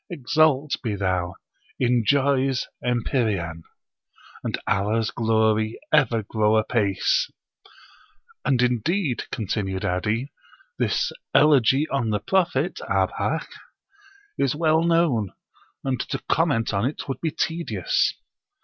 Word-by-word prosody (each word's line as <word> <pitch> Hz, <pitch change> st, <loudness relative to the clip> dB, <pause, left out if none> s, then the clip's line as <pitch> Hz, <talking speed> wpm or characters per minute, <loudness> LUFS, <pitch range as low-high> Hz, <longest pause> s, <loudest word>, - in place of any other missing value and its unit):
Exalt 150 Hz, -2 st, +2 dB
be 110 Hz, -5 st, -2 dB
thou 95 Hz, -2 st, -1 dB, 0.4 s
in 125 Hz, -2 st, +2 dB
Joy's 135 Hz, 0 st, +2 dB, 0.2 s
empyrean! 110 Hz, -, -1 dB, 0.8 s
And -, -, -2 dB
Allah's 105 Hz, +2 st, +1 dB
glory 110 Hz, -1 st, +1 dB
ever 125 Hz, -7 st, +3 dB
grow 110 Hz, +1 st, +2 dB
apace!" 115 Hz, -, +1 dB, 1.1 s
"And 130 Hz, -4 st, +2 dB
indeed," 125 Hz, -, 0 dB
continued 95 Hz, -3 st, -2 dB
'Adi, 105 Hz, +9 st, -1 dB, 0.5 s
"this -, -, +1 dB, 0.2 s
Elegy 140 Hz, 0 st, +5 dB
on 135 Hz, -5 st, -1 dB
the 105 Hz, -1 st, 0 dB
Prophet 175 Hz, -, 0 dB
(Abhak!) -, -, 0 dB, 0.9 s
is 135 Hz, 0 st, +1 dB
well 160 Hz, 0 st, +3 dB
known, 165 Hz, -, +2 dB, 0.5 s
and 130 Hz, -2 st, -1 dB
to -, -, -1 dB
comment 145 Hz, -10 st, +1 dB
on 100 Hz, +1 st, 0 dB
it 135 Hz, +5 st, -3 dB
would 135 Hz, -2 st, -4 dB
be 165 Hz, -, 0 dB
tedious." 160 Hz, -, 0 dB
120 Hz, 105 wpm, -24 LUFS, 110-150 Hz, 1.1 s, Elegy